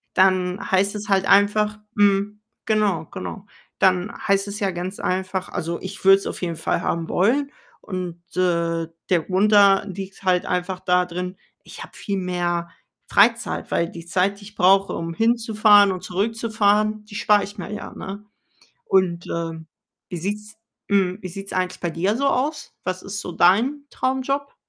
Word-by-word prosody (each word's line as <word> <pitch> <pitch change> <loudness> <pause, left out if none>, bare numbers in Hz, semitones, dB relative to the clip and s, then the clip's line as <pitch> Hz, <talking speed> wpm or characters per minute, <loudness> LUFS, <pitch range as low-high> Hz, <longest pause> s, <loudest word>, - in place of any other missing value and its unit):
dann 185 -1 +3
heißt 195 +2 +2
es 205 0 -6
halt 190 -1 +3
einfach 210 +2 +3 0.2
mhm, 205 0 +2 0.2
genau, 210 -7 +1
genau. 195 - -7 0.3
Dann 185 +3 +2
heißt 195 0 +2
es 205 +2 -5
ja 200 -2 +1
ganz 180 +3 -5
einfach 185 0 -2
also, 170 -1 -3
ich 190 +2 -8
würde 195 0 +8
es - - -7
auf - - -5
jeden 170 -2 -2
Fall - - -1
haben 165 0 -2
wollen. 275 +10 +1 0.3
Und, 180 -3 -5 0.2
äh, 170 -2 +1 0.2
der 175 -3 +3
Grund 200 +3 +1
da 200 -1 +6
liegt 195 0 -8
halt 180 -1 +2
einfach 180 +1 -2
da 180 0 +2
drin, 180 +1 -5 0.3
ich - - -11
habe - - -14
viel 200 -2 -3
mehr 175 -1 -2 0.4
Freizeit, 230 +3 +2
weil 170 0 +1
die 170 0 -10
Zeit, 190 +3 0
die - - -12
ich 205 0 -13
brauche, 195 +1 +4
um 165 0 -4
hinzufahren 215 -2 +4
und 185 -1 -5
zurückzufahren, 215 +1 0
die 210 -1 -12
spare 210 -1 +3
ich 205 +2 -9
mir 195 - -6
ja, 210 - -7
ne? 200 +2 -7 0.6
Und, 180 - +1
äh, 165 -1 -4 0.5
wie 175 - -4
sieht's 210 +4 -5 0.3
mhm, 190 -2 +2
wie 185 - -5
sieht's 195 +3 -8
eigentlich 185 0 -2
bei 175 - -2
dir 190 +7 0
so 280 +2 0
aus? 290 +4 -2
Was 185 0 -3
ist 205 +1 -5
so 180 - -6
dein 235 - +3
Traumjob? 270 - -2
195 Hz, 175 wpm, -22 LUFS, 180-210 Hz, 0.6 s, würde